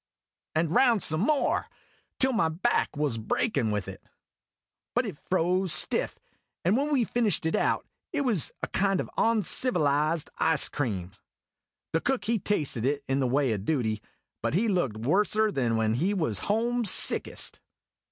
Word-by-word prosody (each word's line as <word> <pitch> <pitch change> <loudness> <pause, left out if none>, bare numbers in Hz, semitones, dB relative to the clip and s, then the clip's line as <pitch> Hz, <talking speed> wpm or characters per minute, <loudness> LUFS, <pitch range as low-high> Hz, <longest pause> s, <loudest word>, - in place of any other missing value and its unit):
And 160 0 +1
round, 235 -6 +4
some 155 +2 +2
more 285 +6 +1 0.5
till 265 0 +2
my 195 -8 +2
back 160 -2 0
was 145 -6 0
breakin' 120 - 0
with 105 -3 -2
it. - - -8 0.9
But 245 +1 +2
it 190 -10 -6
froze 185 0 +1
stiff; - - +1 0.5
and 185 +5 +3
when 285 +4 0
we 270 -5 +3
fished 225 -6 0
it 160 - +1
out, - - 0 0.3
it 300 - -1
was 230 - +1
a - - 0
kind 195 -1 +1
of - - -4
oncivilized 165 - +1
ice 160 -1 +2
cream. 100 -10 -3 0.8
The 165 - +2
Cook 265 0 -1
he 230 0 +1
tasted 150 - -1
it, 140 +2 0
in 135 +1 0
the 130 - +1
way 130 -1 +1
o' - - -1
duty; 110 -1 -1 0.4
but - - -1
he 220 +6 +2
looked 175 - 0
worser 205 - +2
than 120 - 0
when 110 -1 +1
he 180 - 0
was 120 - -1
homesickest. 230 0 +1
165 Hz, 160 wpm, -27 LUFS, 135-220 Hz, 0.9 s, round